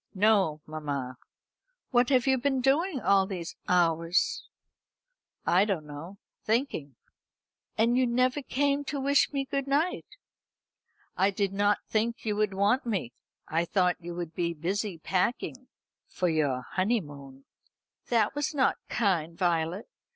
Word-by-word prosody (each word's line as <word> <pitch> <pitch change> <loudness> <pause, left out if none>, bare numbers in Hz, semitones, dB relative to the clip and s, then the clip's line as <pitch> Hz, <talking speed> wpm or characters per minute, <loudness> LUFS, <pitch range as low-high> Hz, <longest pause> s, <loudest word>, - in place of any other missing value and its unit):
"No, 195 -7 +3
mamma." 145 -5 -4 0.8
"What 245 0 +3
have 255 -3 +3
you 265 -1 +3
been 270 +1 +1
doing 285 +5 +2
all 195 -4 +3
these 180 -4 -5
hours?" 170 0 +1 1.0
"I 180 +3 +4
don't 195 -7 -1
know 150 +6 -9 0.3
thinking," 215 - -1 0.8
"And 230 +2 +3
you 255 0 +3
never 255 +4 +1
came 280 +1 0
to 285 0 -3
wish 280 +1 +3
me 275 -2 -1
good 275 0 -2
night." 300 +6 0 1.1
"I 190 +2 +3
did 200 0 -1
not 205 +1 +1
think 230 +2 -1
you 210 -1 0
would 210 -2 0
want 205 +7 +2
me. 190 - -2 0.3
I 165 +2 +1
thought 180 0 +1
you 170 0 -6
would 170 -2 -5
be 170 -1 -1
busy 190 +4 -2
packing 235 +9 -2 0.4
for 180 - -1
your 145 -6 0
honeymoon." 145 - -2 0.6
"That 225 -3 +2
was 290 +1 -2
not 265 -2 +2
kind, 170 -7 0
Violet. 170 +2 0
200 Hz, 135 wpm, -28 LUFS, 165-250 Hz, 1.1 s, I